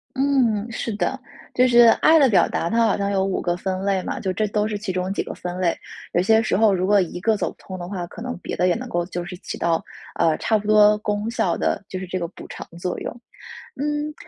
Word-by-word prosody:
嗯， 250 Hz, -6 st, +1 dB
是 235 Hz, 0 st, -3 dB
的。 265 Hz, +5 st, -1 dB, 0.4 s
就 255 Hz, 0 st, +4 dB
是 240 Hz, -1 st, +6 dB, 0.2 s
爱 320 Hz, +1 st, +6 dB
的 275 Hz, -4 st, +5 dB
表 180 Hz, -5 st, +4 dB
达， 170 Hz, -, -2 dB
它 230 Hz, 0 st, +3 dB
好 215 Hz, -, +2 dB
像 200 Hz, 0 st, -1 dB
有 195 Hz, -1 st, +1 dB
5 195 Hz, -, -1 dB
个 175 Hz, -, 0 dB
分 185 Hz, 0 st, -2 dB
类 195 Hz, -2 st, +1 dB
嘛， -, -, -4 dB
这 190 Hz, -, -1 dB, 0.2 s
都 210 Hz, +1 st, 0 dB
是 215 Hz, -1 st, -3 dB
其 205 Hz, -1 st, -5 dB
中 185 Hz, +1 st, -2 dB
几 -, -, -1 dB
个 -, -, -7 dB
分 180 Hz, 0 st, -6 dB
类。 175 Hz, -2 st, +1 dB, 0.4 s
有 175 Hz, -, +3 dB
些 220 Hz, +4 st, +4 dB
时 220 Hz, -, 0 dB
候 215 Hz, 0 st, +4 dB
如 185 Hz, 0 st, 0 dB
果 205 Hz, 0 st, +4 dB
一 175 Hz, -1 st, -3 dB
个 220 Hz, +2 st, +2 dB
走 -, -, -2 dB
不 -, -, -28 dB
通 185 Hz, -1 st, -8 dB
的 175 Hz, -, -6 dB
话， 180 Hz, -3 st, -4 dB
可 220 Hz, -, -10 dB
能 250 Hz, 0 st, -4 dB
别 -, -, -5 dB
的 180 Hz, -, +2 dB
也 175 Hz, -, +3 dB
能 250 Hz, +2 st, -6 dB
够 175 Hz, -5 st, -1 dB
就 175 Hz, -1 st, -4 dB
是 180 Hz, +1 st, -7 dB
起 -, -, -7 dB
到， 165 Hz, -1 st, +1 dB, 0.4 s
呃， 165 Hz, -2 st, +3 dB
差 220 Hz, -, +1 dB
不 205 Hz, -, -8 dB
多 210 Hz, 0 st, +6 dB
功 210 Hz, +1 st, -2 dB
效 185 Hz, -7 st, 0 dB
的， -, -, -1 dB
就 185 Hz, -, -4 dB
是 185 Hz, -, -6 dB
这 185 Hz, +1 st, -3 dB
个 170 Hz, -, -2 dB
补 -, -, -12 dB
偿 -, -, -8 dB
作 180 Hz, +1 st, -3 dB
用。 -, -, -4 dB, 0.6 s
嗯， 295 Hz, +2 st, -2 dB
200 Hz, 275 characters per minute, -22 LUFS, 180-225 Hz, 0.6 s, 是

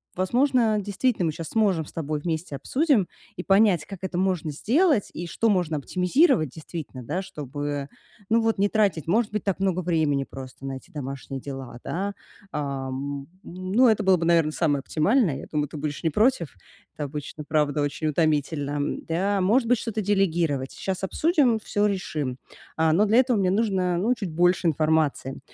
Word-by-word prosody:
возможно, 235 Hz, +3 st, +2 dB
действительно 205 Hz, -2 st, 0 dB
мы -, -, 0 dB
щас 165 Hz, +1 st, -7 dB
сможем 195 Hz, -8 st, +1 dB
с -, -, -14 dB
тобой, 155 Hz, -2 st, -3 dB
вместе 160 Hz, -2 st, -3 dB
обсудим 255 Hz, -, +2 dB, 0.3 s
и 180 Hz, -, -4 dB
понять, 195 Hz, -4 st, +4 dB
как 195 Hz, -3 st, -9 dB
это 190 Hz, -2 st, -4 dB
можно 180 Hz, -4 st, 0 dB
сделать 260 Hz, -, +2 dB
и 175 Hz, +1 st, -5 dB
что 230 Hz, -, 0 dB
можно 175 Hz, -6 st, +1 dB
оптимизировать 180 Hz, -, +2 dB
действительно, 155 Hz, -4 st, -8 dB
да, 175 Hz, +10 st, -2 dB
чтобы, 145 Hz, -3 st, -5 dB, 0.4 s
ну, 230 Hz, +1 st, +4 dB
вот 225 Hz, 0 st, +1 dB
не 200 Hz, +1 st, +3 dB
тратить, 200 Hz, -8 st, +1 dB
может 215 Hz, +4 st, +2 dB
быть, 210 Hz, -, -3 dB
так 195 Hz, -2 st, 0 dB
много 190 Hz, -2 st, +1 dB
времени 160 Hz, -6 st, +1 dB
просто 130 Hz, 0 st, -9 dB
на 135 Hz, -, -3 dB
эти 130 Hz, -, -10 dB
домашние 135 Hz, -1 st, -6 dB
дела, 135 Hz, -3 st, -7 dB
да. 200 Hz, +3 st, -2 dB, 0.4 s
А, 140 Hz, -3 st, -3 dB
м, 140 Hz, +1 st, -5 dB, 0.2 s
ну, 185 Hz, +8 st, +1 dB
это 215 Hz, -2 st, +3 dB
было 190 Hz, -1 st, +5 dB
бы, 165 Hz, -, -2 dB
наверно, 165 Hz, -2 st, +3 dB
самое 150 Hz, -3 st, +1 dB
оптимальное. 165 Hz, -, +2 dB
Я -, -, -8 dB
думаю, 150 Hz, -2 st, -1 dB
ты 155 Hz, -, -8 dB
будешь 145 Hz, 0 st, -4 dB
не 160 Hz, -, +2 dB
против. 210 Hz, -, +1 dB, 0.4 s
Это 150 Hz, -, -4 dB
обычно, 150 Hz, +1 st, -7 dB
правда, 150 Hz, -1 st, +1 dB
очень 145 Hz, +1 st, -2 dB
утомительно, 150 Hz, -2 st, 0 dB
м, 145 Hz, 0 st, -2 dB
да. 195 Hz, +5 st, 0 dB
Может 225 Hz, +6 st, +2 dB
быть, 245 Hz, -, +4 dB
что-то 220 Hz, -1 st, -3 dB
делегировать. 170 Hz, -9 st, +1 dB
Сейчас 190 Hz, -1 st, -4 dB
обсудим, 275 Hz, -, +2 dB
всё 210 Hz, 0 st, 0 dB
решим. 155 Hz, -10 st, -2 dB, 0.4 s
А, 160 Hz, 0 st, +3 dB
но 195 Hz, +7 st, +4 dB
для 220 Hz, +4 st, +4 dB
этого 250 Hz, -3 st, +3 dB
мне 185 Hz, -2 st, +2 dB
нужно, 190 Hz, -4 st, +1 dB
ну, 215 Hz, +8 st, +2 dB
чуть 195 Hz, -7 st, -5 dB
больше 175 Hz, +1 st, +3 dB
информации. 155 Hz, -4 st, +1 dB
170 Hz, 180 wpm, -25 LUFS, 145-205 Hz, 0.4 s, было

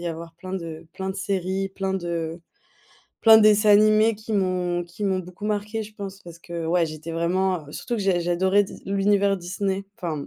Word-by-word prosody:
y 175 Hz, -, -5 dB
avoir 165 Hz, 0 st, -6 dB
plein 185 Hz, +2 st, -9 dB
de 165 Hz, -3 st, -6 dB
plein 190 Hz, 0 st, -4 dB
de 190 Hz, -, -6 dB
séries, 195 Hz, 0 st, -1 dB
plein 195 Hz, 0 st, -3 dB
de 170 Hz, -2 st, -3 dB, 0.8 s
plein 225 Hz, -1 st, +9 dB
de -, -, +4 dB
dessins 210 Hz, 0 st, +5 dB
animés 215 Hz, +2 st, +5 dB
qui 220 Hz, +1 st, -7 dB
m'ont 180 Hz, -2 st, 0 dB
qui 175 Hz, +4 st, -7 dB
m'ont 190 Hz, -2 st, +1 dB
beaucoup 180 Hz, +3 st, -10 dB
marquée, 210 Hz, +1 st, -2 dB
je 215 Hz, 0 st, -11 dB
pense. 195 Hz, -1 st, -7 dB
Parce 170 Hz, -2 st, -11 dB
que, 170 Hz, 0 st, -6 dB
ouais, 170 Hz, +1 st, +2 dB
j'étais 155 Hz, +1 st, -7 dB
vraiment, 175 Hz, 0 st, 0 dB
heu, -, -, -11 dB
surtout 240 Hz, -, -4 dB
que -, -, -3 dB
j'a 190 Hz, -3 st, +2 dB
j'adorais 185 Hz, +4 st, +2 dB
Dis -, -, -12 dB
l'univers 200 Hz, 0 st, +2 dB
Disney, 190 Hz, +2 st, -3 dB
enfin. 165 Hz, -9 st, -4 dB
190 Hz, 205 wpm, -24 LUFS, 170-200 Hz, 0.8 s, plein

